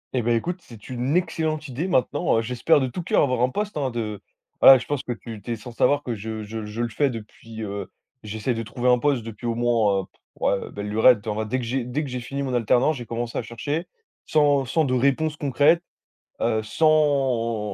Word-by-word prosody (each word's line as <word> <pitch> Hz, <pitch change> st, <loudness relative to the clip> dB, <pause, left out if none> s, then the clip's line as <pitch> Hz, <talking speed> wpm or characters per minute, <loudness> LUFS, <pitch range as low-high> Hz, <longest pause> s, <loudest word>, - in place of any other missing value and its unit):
Eh 125 Hz, -, +2 dB
beh, 120 Hz, +1 st, +2 dB
écoute, 175 Hz, +10 st, -2 dB
c'est 115 Hz, -3 st, -14 dB
une 130 Hz, +6 st, 0 dB
excellente 160 Hz, -3 st, -1 dB
idée 140 Hz, +8 st, -3 dB
maintenant, 145 Hz, -4 st, +1 dB
heu, -, -, +2 dB
j'espère 125 Hz, +6 st, +2 dB
de 130 Hz, -, 0 dB
tout 130 Hz, +8 st, -4 dB
coeur -, -, +3 dB
avoir 125 Hz, -3 st, 0 dB
un 125 Hz, -, +3 dB
poste 210 Hz, +5 st, -3 dB
hein, 140 Hz, -3 st, 0 dB
de 110 Hz, -4 st, -4 dB, 0.4 s
voilà 135 Hz, -, +10 dB
je -, -, -6 dB
pense 145 Hz, -2 st, -2 dB
que 125 Hz, -, -5 dB
tu 110 Hz, -1 st, -7 dB
tu 120 Hz, -, -6 dB
es 115 Hz, -, 0 dB
sans 115 Hz, +3 st, -10 dB
savoir 140 Hz, +5 st, +2 dB
que 120 Hz, -, -3 dB
je 110 Hz, 0 st, -5 dB
je 110 Hz, +1 st, -6 dB
je 110 Hz, +3 st, -4 dB
le 120 Hz, -, -2 dB
fais 140 Hz, +4 st, +1 dB
depuis, 110 Hz, -1 st, -8 dB
heu 100 Hz, -2 st, -5 dB, 0.3 s
j'essaie 110 Hz, +3 st, -3 dB
de 115 Hz, -, -3 dB
trouver 120 Hz, +3 st, -1 dB
un 125 Hz, -1 st, +5 dB
poste 140 Hz, -5 st, +1 dB
depuis 115 Hz, +1 st, -7 dB
au 115 Hz, -, 0 dB
moins, 115 Hz, -5 st, +2 dB
heu, -, -, -8 dB
pff, -, -, -34 dB, 0.2 s
ouais, 100 Hz, -, 0 dB
belle 100 Hz, 0 st, -5 dB
lurette. 110 Hz, 0 st, +4 dB
En 110 Hz, -, -1 dB
vrai, 110 Hz, +1 st, -3 dB
dès 130 Hz, +4 st, -1 dB
que 125 Hz, -, -3 dB
j'ai 125 Hz, +2 st, -1 dB
dès 125 Hz, +6 st, -2 dB
que 140 Hz, -, -6 dB
j'ai 125 Hz, -, -3 dB
fini 140 Hz, +3 st, -4 dB
mon 130 Hz, -, -3 dB
alternance, 120 Hz, +5 st, +2 dB
j'ai 120 Hz, -2 st, -8 dB
commencé 120 Hz, 0 st, -3 dB
à -, -, -1 dB
chercher, 145 Hz, +8 st, -4 dB, 0.4 s
sans 145 Hz, -3 st, +3 dB
sans 155 Hz, +6 st, +1 dB
de 130 Hz, -, 0 dB
réponses 140 Hz, +4 st, +1 dB
concrètes, 145 Hz, +4 st, +3 dB, 0.6 s
heu, 110 Hz, 0 st, +1 dB
sans 130 Hz, -5 st, +1 dB
125 Hz, 235 wpm, -24 LUFS, 115-145 Hz, 0.6 s, voilà